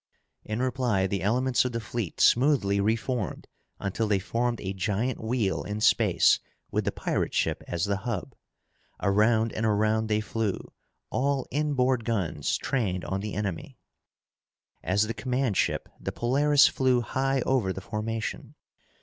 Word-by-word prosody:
In 110 +4 -2
reply, 125 -7 +1
the 95 -1 -2
elements 125 +6 +2
of 125 -1 -3
the 115 - -1
fleet 110 -4 -5
smoothly 120 -7 +4
reformed 115 0 -1 0.3
until 100 +3 -1
they 105 -1 +3
formed 115 +5 -1
a 95 -1 -4
giant 110 +6 -2
wheel 110 -4 0
in 105 +1 -4
space - - +4 0.3
with - - 0
the - - +1
pirate - - -2
ship - - 0
as 85 -1 -1
the 100 -1 0
hub. 100 -1 -4 0.7
Around 110 +3 +2
and 110 - -3
around 110 +1 +2
they 105 0 +1
flew, 110 -2 -2 0.5
all 140 0 0
inboard 130 -4 +1
guns 105 -8 -1
trained 100 -9 -1
on 95 - -2
the 105 +1 -5
enemy. 105 +5 -4 1.0
As 100 +3 +2
the 115 - -3
command 125 0 -1
ship, - - 0
the - - -4
Polaris 140 +4 +4
flew 130 -2 +2
high 135 +3 0
over 120 -7 +1
the 95 - -5
formation. 110 +3 -4
110 Hz, 150 wpm, -27 LUFS, 100-125 Hz, 1.0 s, smoothly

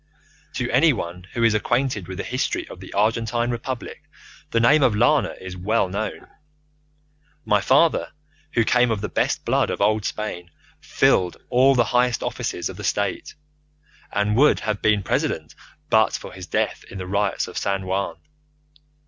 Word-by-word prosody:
"To 125 0 -1
anyone 105 - +1
who 120 - -1
is 115 -2 +4
acquainted 120 -2 0
with 95 -1 -7
the - - -3
history - - -2
of - - -10
the - - -11
Argentine 115 +3 +1
Republic 120 +1 -5 0.5
the 115 - +1
name 140 +7 +5
of 120 -6 +3
Lana 125 +8 +2
is 95 0 -8
well 100 +2 0
known. 100 +4 -4 1.2
My 105 -1 +3
father, 140 +9 +3 0.4
who 120 - +3
came 125 +1 +3
of 110 -3 -1
the 105 - -3
best - - -1
blood - - +1
of - - -3
old 110 0 +2
Spain, 90 -6 -4 0.3
filled 90 -1 +2
all 135 +2 +5
the 120 - +4
highest 125 -1 +2
offices 85 - -3
of 95 - -8
the 105 - -8
State, 100 +1 -2 0.8
and 105 +1 0
would 145 +5 +4
have 105 -2 -2
been 105 -2 +2
President - - -2 0.4
but - - +4
for - - -6
his 90 -2 -9
death - - -1
in 100 - -8
the 95 - -5
riots 100 +1 -1
of - - -10
San 95 -1 -1
Juan. 95 +1 -2
105 Hz, 165 wpm, -23 LUFS, 95-120 Hz, 1.2 s, name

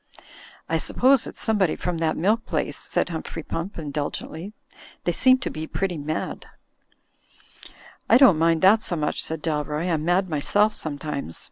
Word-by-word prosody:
"I - - 0
suppose 265 0 +3
it's - - -8
somebody 205 -7 +1
from 175 -2 -3
that 160 -1 0
milk 215 +7 +1
place," 145 -3 -2
said - - -2
Humphrey 160 -1 -5
Pump, 170 +7 -5
indulgently. 155 +4 -5 0.5
"They 175 - +1
seem 255 +9 +4
to 260 - -4
be 155 +1 -5
pretty 180 -3 -2
mad." 155 +2 -4 1.6
"I 235 - +8
don't 250 - +6
mind 165 0 +2
that 210 +4 +6
so 175 - -2
much," 150 -2 -1
said 160 -1 -5
Dalroy, 150 +2 -1
"I'm 155 -1 -1
mad 180 +3 +2
myself 205 +7 +2
sometimes. 145 - -4
165 Hz, 155 wpm, -24 LUFS, 155-200 Hz, 1.6 s, I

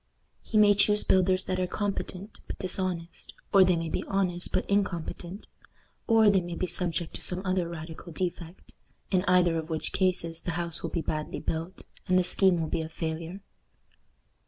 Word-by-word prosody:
He 220 - -1
may 210 -1 +7
choose 210 +1 +3
builders 185 0 +3
that 185 0 -2
are 185 - 0
competent 200 0 -4
but - - -5
dishonest, 180 -2 -4 0.2
or 195 -1 +8
they 180 -1 +4
may 165 0 -2
be - - -2
honest 180 -3 0
but - - 0
incompetent, 195 -1 -2 0.6
or 225 -2 +5
they 195 -2 +3
may 175 -1 -5
be 185 - -1
subject 175 -1 -3
to - - -7
some 185 +2 -2
other 185 -2 0
radical 165 +1 -8
defect; 175 +1 -5 0.4
in 185 -2 +3
either 180 -2 +4
of 160 +1 -7
which 160 -1 -3
cases 170 -3 0
the 175 - -3
house 170 0 -3
will - - -3
be 170 - -2
badly 155 -1 -3
built, 165 +3 -4 0.2
and 185 - +4
the 185 - +4
scheme 185 -1 +4
will 160 - -1
be 160 - -1
a 160 - -5
failure. 165 +3 -5
180 Hz, 180 wpm, -28 LUFS, 165-190 Hz, 0.6 s, or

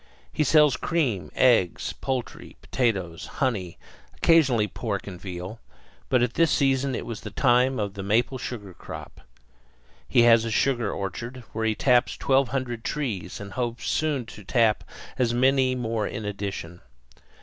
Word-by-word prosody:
He 155 - +1
sells 150 -3 +5
cream, 135 - -1
eggs, 115 -9 +3
poultry, 130 -2 -5
potatoes, 95 -9 -1
honey, 100 -10 -1 0.4
occasionally 135 -10 +4
pork 105 -2 -4
and 90 -3 -8
veal; 95 +3 -6 0.5
but 125 -2 +3
at 120 -1 0
this 165 -1 +3
season 135 -1 +2
it - - -4
was 115 -2 -6
the 105 - -6
time 125 +3 +3
for 105 - 0
the 100 0 -8
maple 115 +6 +1
sugar 110 -7 -6
crop. - - -10 0.9
He 120 - +5
has 115 -1 +6
a 115 - -2
sugar 120 -2 +1
orchard, 120 +6 -5
where 110 0 -1
he 110 - +1
taps 125 0 +2
twelve 135 0 +2
hundred 120 -2 -3
trees 105 - -3
and 100 -1 -8
hopes 120 0 -3
soon 150 -6 0
to 105 -2 -11
tap 110 +1 +2 0.4
as 120 -2 +2
many 130 0 +3
more 115 -3 -1
in 105 - -5
addition. 100 -4 -5
120 Hz, 155 wpm, -25 LUFS, 105-130 Hz, 0.9 s, has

